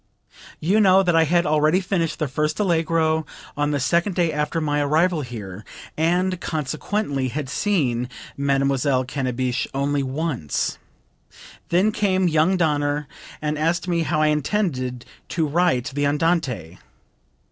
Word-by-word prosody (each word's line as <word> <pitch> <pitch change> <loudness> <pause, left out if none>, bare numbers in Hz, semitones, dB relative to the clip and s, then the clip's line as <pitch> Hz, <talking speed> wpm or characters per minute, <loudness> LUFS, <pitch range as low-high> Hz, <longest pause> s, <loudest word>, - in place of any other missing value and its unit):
14. 160 - -3
"You 215 - +5
know 195 -2 +5
that 175 -2 +2
I 165 0 +5
had 170 +2 +2
already 155 +3 +3
finished 175 -4 -1
the 150 - -1
first 150 +5 -1
Allegro 165 -4 +1 0.3
on 145 0 0
the 145 -1 0
second 170 +7 +1
day 170 -3 +1
after 150 +2 -1
my 145 -2 0
arrival 160 +3 +2
here, 105 -6 -7 0.3
and 180 +3 +1
consequently 145 -1 -2
had 140 +2 -4
seen 130 - 0 0.3
Mademoiselle 140 -1 +1
Cannabich 130 -1 -2
only 140 +1 0
once. 135 - -2 0.9
Then 185 +5 +3
came 190 -3 +1
young 165 +3 +3
Danner 145 -3 0 0.4
and 150 0 -1
asked 170 +3 0
me 170 -2 +1
how 155 -1 +1
I 155 - +4
intended 140 - -1 0.2
to 160 0 0
write 155 -5 +1
the 145 +1 +1
Andante. 140 - -1
155 Hz, 140 wpm, -22 LUFS, 140-170 Hz, 0.9 s, You